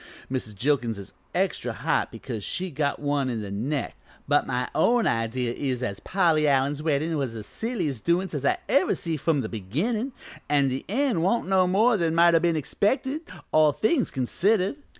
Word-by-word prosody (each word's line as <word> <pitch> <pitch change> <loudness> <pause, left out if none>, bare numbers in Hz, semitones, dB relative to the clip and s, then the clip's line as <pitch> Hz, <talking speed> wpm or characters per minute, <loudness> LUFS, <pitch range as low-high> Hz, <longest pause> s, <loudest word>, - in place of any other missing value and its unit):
Mrs. 120 -5 -3
Jilkins 120 -1 0
is 100 - -10 0.2
extra - - 0
hot - - 0
because 115 -6 -6
she 185 - -3
got 145 0 -1
one 145 -2 0
in 115 -3 -2
the 100 - -6
neck, 130 +8 -2 0.3
but 145 0 +2
my 125 -1 -1
own 240 -1 +3
idea 115 +1 0
is 130 -2 -2
as 100 -5 -3
Polly 165 -5 +2
Allen's 140 +1 +2
weddin' 155 +1 0
was 130 -5 -3
the 110 - -6
silliest 170 - -3
doin's 175 +2 +1
as 145 -3 -3
I 140 - +2
ever 185 - +3
see 165 -2 -3
from 150 -1 +1
the - - -3
beginnin', 175 - -2 0.4
an' 140 -2 +3
the 130 +1 -4
end 245 - +1
wan't 195 +6 +1
no 190 -1 +3
more 215 +5 +3
than 165 -3 0
might 170 0 +6
o' 165 - +6
been 170 0 +1
expected 260 - 0 0.3
all 155 -1 +5
things 245 - +1
considered. 190 - +1
150 Hz, 185 wpm, -26 LUFS, 130-185 Hz, 0.4 s, might